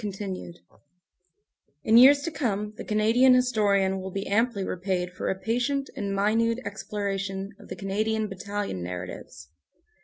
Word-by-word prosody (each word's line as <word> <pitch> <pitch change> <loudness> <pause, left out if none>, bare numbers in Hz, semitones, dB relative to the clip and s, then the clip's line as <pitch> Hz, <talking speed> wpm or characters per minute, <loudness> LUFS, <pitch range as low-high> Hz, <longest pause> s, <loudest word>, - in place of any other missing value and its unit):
CONTINUED 190 -4 -6 1.2
IN 220 - +3
years 280 +4 +8
to 335 - -3
come 210 -7 -2
the - - -7
Canadian 225 +5 +4
historian 200 -6 +2
will 190 - -5
be 195 +1 -4
amply 220 -1 +1
repaid 180 -1 -2
for - - -3
a 190 - -1
patient 245 +6 -1
and 200 -1 -3
minute 225 +3 +2
exploration 200 -1 -4
of - - -14
the - - -6
Canadian 215 +2 -1
battalion 200 - -4
narratives. 90 -3 -7
205 Hz, 140 wpm, -26 LUFS, 190-225 Hz, 1.2 s, years